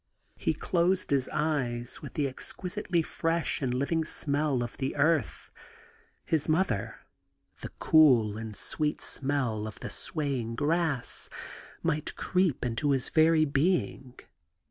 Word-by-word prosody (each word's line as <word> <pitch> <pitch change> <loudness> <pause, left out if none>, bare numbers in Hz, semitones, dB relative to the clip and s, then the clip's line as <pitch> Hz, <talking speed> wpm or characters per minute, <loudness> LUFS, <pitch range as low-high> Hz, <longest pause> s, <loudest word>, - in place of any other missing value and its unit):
He - - -1
closed 185 0 +1
his 135 -2 +1
eyes 130 -6 -1
that - - -9
the 145 -2 +1
exquisitely 175 +5 -1
fresh 165 0 0
and 130 -3 0
living 140 +6 0
smell 145 -4 0
of 120 - -7
the 135 -1 -2
earth, 150 -3 +1 0.7
his 155 -1 0
mother, 155 - 0 0.6
the - - -6
cool 130 -9 +5 0.2
sweet 150 +6 -2
green - - -14
smell 130 -6 -2
of 110 - -9
the - - -6
swaying 135 -8 -3
grass, 150 -2 -1 0.5
might 150 +1 -1
creep 180 -9 0
into 125 +5 -1
his 135 -2 +1
very 160 0 +4
being. 140 -3 0
145 Hz, 125 wpm, -29 LUFS, 130-160 Hz, 0.7 s, cool